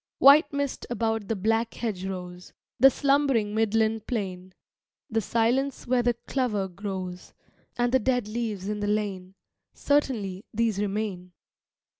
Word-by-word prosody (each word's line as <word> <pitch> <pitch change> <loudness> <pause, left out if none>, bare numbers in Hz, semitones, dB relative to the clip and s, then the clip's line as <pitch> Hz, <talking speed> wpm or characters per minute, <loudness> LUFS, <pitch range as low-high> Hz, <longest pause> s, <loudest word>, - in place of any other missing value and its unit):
White 285 +4 +7
mist 280 -1 -3
about 225 -3 -1
the 225 - -1
black 225 +3 0
hedgerows, 180 -4 -5 0.3
The 270 +3 +9
slumbering 275 -6 +2
Midland 220 0 +1
plain, 185 -5 -4 0.6
The 225 0 +1
silence 245 +6 0
where 245 0 +2
the 240 0 +1
clover 220 -8 -1
grows, 185 -1 -6 0.4
And 240 0 +1
the 260 - +4
dead 250 -2 0
leaves 215 -4 -3
in 210 0 -2
the 205 - -2
lane, 195 -3 -2 0.4
Certainly, 220 -10 0
these 225 -3 +1
remain. 200 -3 -3
220 Hz, 130 wpm, -26 LUFS, 195-240 Hz, 0.6 s, The